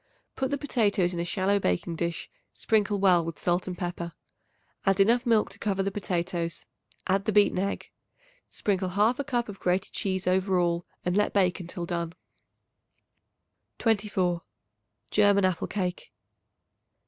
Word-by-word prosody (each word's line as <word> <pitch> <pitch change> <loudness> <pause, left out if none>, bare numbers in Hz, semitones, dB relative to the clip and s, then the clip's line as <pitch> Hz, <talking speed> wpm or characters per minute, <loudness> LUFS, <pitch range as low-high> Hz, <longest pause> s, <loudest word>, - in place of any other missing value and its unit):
Put 265 - -1
the 285 - 0
potatoes 205 -10 +1
into 170 - -2
a - - -2
shallow 190 +3 +1
baking 165 - -1
dish, 170 0 -3 0.3
sprinkle 210 -2 +1
well 180 -3 +5
with 165 -2 -5
salt 175 +3 0
and 180 -1 -4
pepper. 175 -1 -4 0.7
Add 195 0 +2
enough 235 +5 +4
milk 225 -2 +3
to - - -13
cover 195 -2 0
the 195 - -1
potatoes; 175 -3 -2 0.4
add 195 +1 +1
the - - +1
beaten 205 -3 +4
egg. 200 +1 -3 0.6
Sprinkle 190 -2 -1
1/2 220 +9 +1
cup 240 -4 0
of 200 -2 -8
grated 180 +1 0
cheese 190 -1 -2
over 185 +1 +2
all 170 0 0 0.2
and 180 0 +1
let 210 0 +2
bake 190 -2 +2
until 175 0 -5
done. 170 -1 -3 1.6
24. 200 -6 +1 0.7
German 205 -2 +4
Apple 185 -2 0
Cake. 185 -3 -3
190 Hz, 150 wpm, -27 LUFS, 175-205 Hz, 1.6 s, well